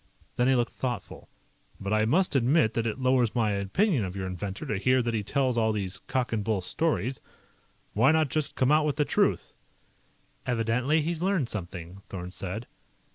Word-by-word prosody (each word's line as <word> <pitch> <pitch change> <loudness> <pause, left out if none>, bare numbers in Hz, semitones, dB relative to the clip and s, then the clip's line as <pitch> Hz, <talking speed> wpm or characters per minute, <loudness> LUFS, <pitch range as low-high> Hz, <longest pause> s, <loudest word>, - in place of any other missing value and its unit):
Then 125 - +2
he 135 - +4
looked 120 -1 0
thoughtful. 120 -5 -5 0.5
"But 100 +2 -2
I 110 0 +3
must 165 +6 +2
admit 130 -1 +3
that 115 0 0
it 110 - -2
lowers 130 -3 +2
my 110 -3 +2
opinion 110 - +1
of 95 -1 -4
your 95 -1 -3
inventor 95 +1 -5
to 105 - -2
hear 130 +5 +3
that 120 0 -1
he 110 - 0
tells 130 +2 0
all 110 -1 +2
these 95 -3 -2
cock 130 -3 -1
and 105 -2 0
bull 105 -2 0
stories. 135 - -1 0.7
Why 115 +8 +5
not 160 -2 +2
just 155 0 -1
come 130 +1 +2
out 155 +1 +5
with 145 - 0
the 150 - +1
truth?" - - +1 0.9
"Evidently 125 +6 +1
he'd 165 +1 -2
learned 185 -9 +1
something," 90 -2 -7
Thorn 90 -2 -6
said. 100 +5 -5
120 Hz, 185 wpm, -28 LUFS, 100-135 Hz, 0.9 s, Why